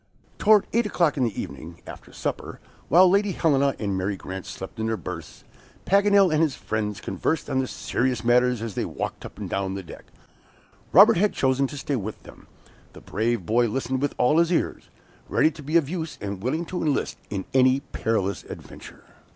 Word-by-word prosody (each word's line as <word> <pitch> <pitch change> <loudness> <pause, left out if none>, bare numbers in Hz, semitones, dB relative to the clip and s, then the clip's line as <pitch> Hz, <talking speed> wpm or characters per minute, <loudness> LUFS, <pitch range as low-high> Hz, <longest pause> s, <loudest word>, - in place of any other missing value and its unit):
Toward 215 -1 +5
eight 230 -1 +2
o'clock 170 -7 +1
in 135 - 0
the 115 - -3
evening, 80 +5 -8
after - - -11
supper, - - -5 0.3
while 180 +6 +7
Lady 200 +1 +2
Helena 140 -5 +2
and 100 -3 -2
Mary 95 +1 -2
Grant 95 0 -7
slept 95 +4 -8
in 110 - -1
their 110 0 -1
berths, - - -8 0.4
Paganel 200 -2 +4
and 155 - +3
his 155 -5 +1
friends 105 -2 -3
conversed 120 - -2
on 130 -1 0
serious 125 -2 -1
matters 125 -1 +3
as 115 -3 -4
they - - -2
walked - - -5
up - - -18
and - - -5
down 95 -1 -2
the 95 - -5
deck. 85 - -12 0.9
Robert 205 +5 +8
had 205 +3 +2
chosen 135 +1 +1
to 145 - -8
stay 140 +1 -2
with 110 0 -6
them. - - -15 0.5
The - - -13
brave 110 -2 -1
boy 120 +5 +2
listened 130 +3 -2
with 145 - -1
all 150 +6 +3
his 170 +1 +2
ears, 175 - -1 0.4
ready 155 - +3
to 155 - -12
be 150 +4 +2
of 160 -5 +1
use, 160 -1 -4
and 100 -2 -5
willing 155 +9 -1
to 180 +2 -4
enlist 150 -3 -1
in 95 -2 -4
any 130 +1 +4
perilous 100 -8 -2
adventure. - - -11
130 Hz, 190 wpm, -25 LUFS, 110-160 Hz, 0.9 s, Robert